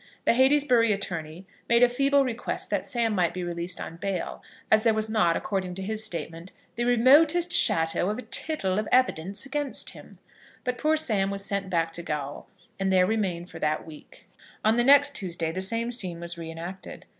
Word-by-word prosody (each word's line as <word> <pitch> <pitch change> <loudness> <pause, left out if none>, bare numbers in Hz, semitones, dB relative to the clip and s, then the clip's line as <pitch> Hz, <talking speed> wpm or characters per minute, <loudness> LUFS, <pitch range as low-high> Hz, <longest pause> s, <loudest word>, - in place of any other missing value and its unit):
The - - +4
Heytesbury 260 -3 +4
attorney 170 -3 -4 0.2
made 235 +1 +5
a - - +7
feeble 275 +3 +2
request 235 -2 -4
that - - -1
Sam 235 -4 0
might 180 -4 0
be 180 - -4
released 175 +1 -4
on 165 - -7
bail, 190 0 -4 0.3
as 215 - +5
there 225 -1 +2
was 220 0 0
not, 215 -7 +2
according 185 -3 -3
to 190 - -6
his 220 +2 -1
statement, 170 -3 -5 0.2
"the 240 - -1
remotest 295 +8 +4
shadow 165 +3 +4
of 210 - -2
a 250 - -7
tittle 205 -12 0
of 215 - -3
evidence 200 -5 +1
against 285 0 -2
him." - - -14 0.5
But 250 -1 -3
poor 315 0 +2
Sam 210 -10 +1
was 200 0 -3
sent 200 -1 -3
back 165 -2 -1
to 170 - -2
gaol, 145 -4 -5 0.3
and 195 0 0
there 185 -1 +4
remained 185 -5 -2
for - - -9
that 155 0 -1
week. 155 -2 -14 0.4
On 220 +1 +4
the 240 - +2
next 285 +2 +5
Tuesday 170 - -3
the 185 +3 -4
same 230 +5 -2
scene 185 -8 -2
was 170 0 -4
re 165 -1 -8
enacted. 170 +4 -8
200 Hz, 195 wpm, -26 LUFS, 175-245 Hz, 0.5 s, a